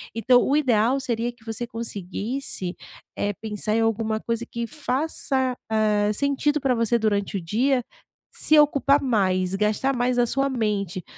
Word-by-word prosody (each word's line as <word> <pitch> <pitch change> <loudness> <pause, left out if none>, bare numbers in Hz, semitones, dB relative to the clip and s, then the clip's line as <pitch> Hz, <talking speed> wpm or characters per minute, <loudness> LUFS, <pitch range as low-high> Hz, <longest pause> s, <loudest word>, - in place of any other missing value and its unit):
Então 245 +2 +4
o 275 - +2
ideal 250 -2 +2
seria 240 -2 -2
que 240 -2 -24
você 225 +1 -4
conseguisse 220 -2 -4 0.4
é 205 - 0
pensar 215 +1 -3
em 225 - +2
alguma 225 -1 0
coisa 230 +1 -3
que 235 -1 -4
faça, 265 -1 -1 0.2
hã, 210 -1 +2
sentido 280 +4 0
pra 265 -3 +2
você 230 0 +2
durante 205 -2 0
o - - -4
dia, 245 +9 +1 0.5
se 310 - +3
ocupar 285 -1 +4
mais 190 -7 +1
gastar 215 +7 0
mais 245 0 0
a 240 - +4
sua 275 +3 0
mente, 205 -7 -2
230 Hz, 155 wpm, -24 LUFS, 210-260 Hz, 0.5 s, Então